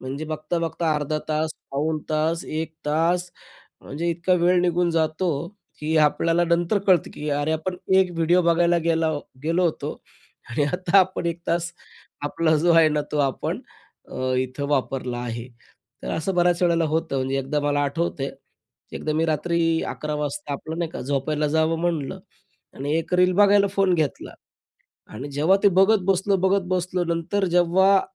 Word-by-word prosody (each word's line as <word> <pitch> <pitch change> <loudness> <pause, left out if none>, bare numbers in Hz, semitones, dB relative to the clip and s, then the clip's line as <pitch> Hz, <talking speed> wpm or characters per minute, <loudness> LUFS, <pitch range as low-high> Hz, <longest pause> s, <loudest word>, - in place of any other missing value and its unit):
म्हणजे 135 +4 -5
बघता-बघता 160 +1 -2
अर्धा 150 +1 -1
तास, 155 +1 0 0.2
पाऊण 155 +3 -1
तास, 160 +2 0
1 160 +1 -4
तास. 170 +4 +1 0.5
म्हणजे 165 +5 -3
इतका 170 +2 +1
वेळ 180 +1 +4
निघून 175 0 +1
जातो, 165 +2 0 0.5
की 155 +1 -1
आपल्याला 165 +3 +3
नंतर 170 +4 +1
कळतं, 185 -3 +4
की 150 +1 -5
"अरे, 145 +2 0
आपण 160 +4 -2 0.2
एक 190 -1 +3
व्हिडिओ 170 +2 +3
बघायला 170 0 +3
गेला 165 -1 +1 0.3
गेलो 165 +3 +1
होतो 170 -3 -1 0.6
आणि 125 +5 0
आता 180 +1 +2
आपण 185 -1 0
1 170 0 -2
तास 170 0 0 0.5
आपला 160 +2 +1
जो 170 +3 +3
आहे 165 -1 +6
ना 150 0 0
तो 150 - -1
आपण 130 - -4 0.5
अ, 130 0 -2
इथं 130 +2 -2
वापरला 130 -3 -1
आहे." 120 0 -5 0.6
तर - - -4
असं 180 +4 -2
बऱ्याच 175 0 +2
वेळेला 170 -1 +3
होतं. 160 -1 -1
म्हणजे 135 +1 -1
एकदा 135 +3 -1
मला 145 0 +1
आठवतंय, 140 -1 -2
की - - -19
एकदा 155 - -2
मी 160 +1 +1
रात्री 165 +2 0 0.3
11:00 150 0 -4
वाजता 150 +3 -4
आपलं, 160 +3 -6
नाही 170 -1 -2
का, - - -6
झोपायला 145 +3 -1
जावं 160 +1 +2
म्हणलं 165 -5 -2 0.6
आणि 145 +2 -3
एक 165 +2 -4
रील 180 0 +4
बघायला 200 +1 +5
फोन 195 -2 +3
घेतला. 155 -5 -2 0.8
आणि 130 +7 -6
जेव्हा 155 +7 +3
ते 205 - +7
बघत 210 +3 +5
बसलो, 195 +1 +2
बघत 190 +1 +2
बसलो 180 -1 -1
नंतर 180 +4 -1
जेव्हा 190 +3 +4
165 Hz, 165 wpm, -23 LUFS, 150-175 Hz, 0.8 s, ते